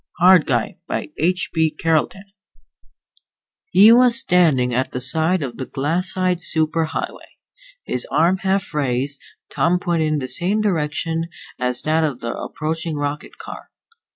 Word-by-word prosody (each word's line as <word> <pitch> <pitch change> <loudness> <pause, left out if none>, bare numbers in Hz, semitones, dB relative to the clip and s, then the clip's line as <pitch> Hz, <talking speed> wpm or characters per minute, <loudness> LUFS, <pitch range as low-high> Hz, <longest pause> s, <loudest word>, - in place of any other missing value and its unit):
_ - - -52 0.2
HARD 185 -4 +7
GUY 120 -4 -1
By - - -3
H. 180 +4 0
B. 160 -1 +2
CARLETON 165 +5 -1 1.5
He 215 - +7
was 240 0 +5
standing 150 -9 +2
at 130 +2 -1
the 125 - -2
side 160 +6 +1
of 120 -4 -6
the 130 - -5
glassite 180 +5 0
super 160 0 0
highway, 160 - -6 0.5
his 125 - -3
arm 165 +6 +3
half 190 -2 -1
raised, 140 -1 -1 0.3
thumb 175 +2 +2
pointed 170 -3 0
in 155 - +1
the 130 -3 -3
same 185 +9 -1
direction 165 -4 -1 0.3
as 125 0 -2
that 160 +1 +2
of 145 -5 -2
the 115 0 -4
approaching 160 +1 -4
rocket 145 0 -4
car. - - -10
160 Hz, 150 wpm, -20 LUFS, 140-180 Hz, 1.5 s, HARD